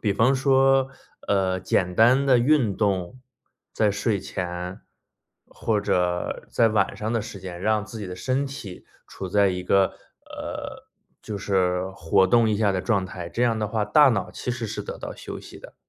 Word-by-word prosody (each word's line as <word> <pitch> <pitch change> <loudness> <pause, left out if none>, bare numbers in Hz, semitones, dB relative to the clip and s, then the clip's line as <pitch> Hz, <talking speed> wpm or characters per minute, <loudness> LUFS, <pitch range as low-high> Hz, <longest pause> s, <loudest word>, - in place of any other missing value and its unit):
比 105 -3 +1
方 125 +6 +3
说， 135 0 +3 0.4
呃， 95 -2 +1
简 90 -1 0
单 125 +7 +5
的 130 -3 +5
运 120 -5 +3
动 100 +3 -1 0.5
在 105 -2 +2
睡 100 +1 0
前， 90 0 -5 0.7
或 110 -2 -1
者 90 -3 -1
在 115 - +3
晚 105 -3 +1
上 110 +2 -3
的 115 - +1
时 105 -1 -8
间， 90 -2 -8
让 105 0 +1
自 110 +1 -9
己 100 - -5
的 90 0 -7
身 130 +6 -1
体 105 -9 -9 0.2
处 95 - -7
在 100 +1 +3
一 90 -1 -3
个， 95 +1 +3 0.3
呃， - - -7 0.4
就 105 -2 -5
是 95 -2 0
活 95 +3 +2
动 115 +2 +4
一 105 - +1
下 105 -2 +2
的 95 - -1
状 100 -3 0
态， 90 -2 -7
这 120 - -2
样 115 -2 +2
的 105 - -1
话 110 -1 -1
大 145 +7 +6
脑 100 -5 -1
其 - - -5
实 120 -2 -3
是 - - -5
得 - - -7
到 - - -7
休 - - -8
息 - - -12
的。 - - -14
105 Hz, 205 characters per minute, -24 LUFS, 95-120 Hz, 0.7 s, 大